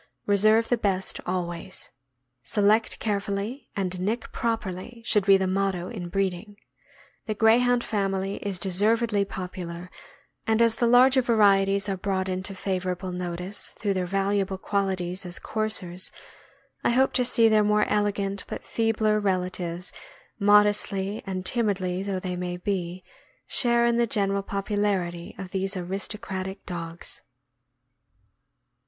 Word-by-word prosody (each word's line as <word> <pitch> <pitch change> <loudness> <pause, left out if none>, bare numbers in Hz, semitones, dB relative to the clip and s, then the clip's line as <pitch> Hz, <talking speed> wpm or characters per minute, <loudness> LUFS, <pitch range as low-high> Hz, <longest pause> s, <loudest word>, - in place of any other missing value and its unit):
Re 205 - +3
serve 215 +3 +4
the 245 - +2
best 190 -3 0
always. 175 0 -4 0.5
Select 210 - +2
carefully 205 +4 -3
and 185 -3 -2
nick 220 +6 -2
properly 225 0 -3
should 210 -4 +3
be 195 -1 +7
the 190 - 0
motto 185 -1 -1
in 180 -7 -6
breeding. 195 +2 -2 0.7
The 215 - -1
Greyhound 240 +2 +4
family 195 -1 -1
is 200 -2 -2
deservedly 205 +3 +2
popular, 180 -2 -7 0.6
and 220 0 +2
as 230 -1 +4
the 235 - +2
larger 255 +2 +6
varieties 200 -4 +3
are 195 -1 -1
brought 190 0 -1
into 185 +1 -1
favorable 185 -1 -3
notice 180 +2 -2
through 205 -2 0
their 185 -1 -2
valuable 195 0 0
qualities 190 -2 -2
as 175 -1 -1
coursers, 195 -5 -2 0.7
I - - +3
hope 260 +3 +3
to 250 - +4
see 235 -2 +4
their 215 -1 +4
more 210 0 +3
elegant 205 -1 0
but - - -6
feebler 220 -1 +1
relatives, 180 -2 -1 0.5
modestly 205 -1 +3
and 185 -1 -4
timidly 190 -5 0
though 195 -1 -2
they 180 -1 -4
may, 180 0 -3 0.4
share 235 -1 +4
in 235 0 +2
the 235 0 +2
general 200 -2 +1
popularity 195 -4 -2
of 185 -1 -7
these 195 0 -2
aristocratic 190 +1 -4
dogs. 170 -2 -6
195 Hz, 130 wpm, -26 LUFS, 185-215 Hz, 0.7 s, be